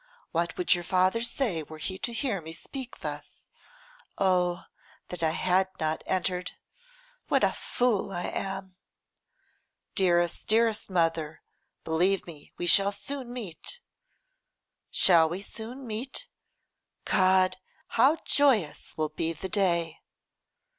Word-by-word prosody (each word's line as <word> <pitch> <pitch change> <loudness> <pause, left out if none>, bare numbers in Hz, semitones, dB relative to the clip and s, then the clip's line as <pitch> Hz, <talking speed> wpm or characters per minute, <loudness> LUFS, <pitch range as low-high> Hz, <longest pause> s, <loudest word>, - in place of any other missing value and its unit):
What 170 0 -1
would 180 - +4
your 175 -1 -2
father 185 +5 +2
say 235 - -1
were 155 +1 -10
he 185 +4 -5
to 240 - -1
hear 230 -5 -1
me 160 0 -8
speak 255 - -8
thus? - - -7 0.7
Oh! 180 -2 +2 0.5
that 180 - -6
I 160 - +3
had 185 +3 +2
not 155 0 0
entered! 180 -1 -1 0.7
What - - +2
a - - +5
fool 235 -6 0
I 175 -2 -3
am!' 190 -1 -4 1.2
'Dearest, 175 -3 +2
dearest 225 -1 +2
mother, 165 -3 0 0.4
believe 180 +4 +2
me 155 -4 -12
we 175 - -2
shall 195 +3 +5
soon 245 +5 -6
meet.' 240 - -6 1.1
'Shall 165 -3 +5
we 175 +3 -3
soon 240 +6 -7
meet? 245 - -4 0.8
God! 185 -1 +4 0.3
how 295 +5 +4
joyous 245 - +2
will 155 -1 0
be 165 +2 -2
the 190 +4 -6
day. 170 -5 +1
185 Hz, 125 wpm, -28 LUFS, 170-220 Hz, 1.2 s, a